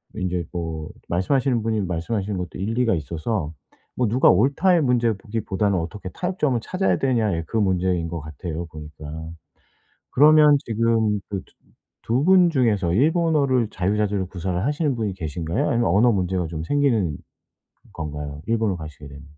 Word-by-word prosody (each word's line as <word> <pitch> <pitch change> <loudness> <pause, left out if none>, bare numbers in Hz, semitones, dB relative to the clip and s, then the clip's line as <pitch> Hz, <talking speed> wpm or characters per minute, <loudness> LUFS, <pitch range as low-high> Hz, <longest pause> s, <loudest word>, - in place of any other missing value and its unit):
인제 90 -3 -2
뭐 80 -3 -4 0.2
말씀하시는 120 +6 +1
분이 110 -2 0
말씀하시는 95 +3 -2
것도 90 0 -6
일리가 115 +1 +1
있어서 80 +2 -3 0.4
뭐 125 -3 +1
"누가 125 +5 +4
옳다."의 145 - +3
문제로 120 -5 +2
보기보다는 100 -2 -1
"어떻게 90 +3 -6
타협점을 155 - -1
찾아야 185 - 0
되느냐."의 110 -11 0
그 115 - -2
문제인 90 -4 +1
것 85 -1 -4
같아요 80 +2 -6
보니까. 75 -1 -11 1.1
그러면 150 +1 +6
지금 110 -2 +1
그 100 -2 -4
두 - - -27 0.5
두 125 +5 +1
분 180 -1 +6
중에서 110 - +1
일본어를 145 - +2
자유자재로 100 0 0
구사를 90 0 -3
하시는 145 -2 0
분이 105 -4 -2
계신가요? 80 -1 -2
아니면 120 0 +1
언어 110 +6 +4
문제가 90 -3 -1
좀 80 0 -5
생기는 115 - +1 0.8
건가요, 75 -2 -6
일본으로 110 -4 0
가시게 75 -2 -10
되면? 70 +1 -12
105 Hz, 370 characters per minute, -23 LUFS, 85-125 Hz, 1.1 s, 그러면